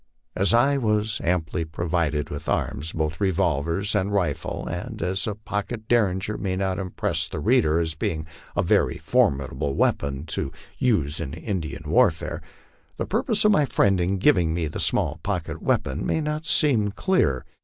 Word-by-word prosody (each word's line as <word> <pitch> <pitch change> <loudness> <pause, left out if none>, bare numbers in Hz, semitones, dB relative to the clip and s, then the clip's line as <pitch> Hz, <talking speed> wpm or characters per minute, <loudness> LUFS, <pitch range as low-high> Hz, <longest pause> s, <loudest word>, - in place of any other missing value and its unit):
As 95 +1 +2
I 135 +4 +4
was 105 -2 0
amply 85 -1 0
provided 80 -2 -1
with 75 - -5
arms, 80 +4 -1
both 80 +3 -2
revolvers 85 +1 +1
and 100 -1 0
rifle, 90 -8 -1
and - - -5
as 95 +4 -1
a 105 - -2
pocket 110 +1 -4
Derringer 105 -3 +1
may 95 -2 -1
not 95 0 -1
impress 95 -2 -2
the - - -4
reader 80 +1 +3
as 80 -1 0
being 80 0 -2 0.3
a - - +2
very - - +2
formidable 70 0 +1
weapon 70 +1 0
to 80 - 0 0.3
use 80 - +2
in 80 -3 -4
Indian 85 -2 -4
warfare, - - +2 0.6
the - - -2
purpose 215 -1 0
of 210 - +6
my 150 -8 +4
friend 100 -7 +2
in 95 +3 0
giving 90 - +3
me 85 -2 -1
the 75 - -4
small - - 0
pocket - - -3
weapon 65 +3 0
may - - 0
not 150 +1 -3
seem 120 -9 +3
clear. 100 - +1
90 Hz, 165 wpm, -24 LUFS, 80-105 Hz, 0.6 s, of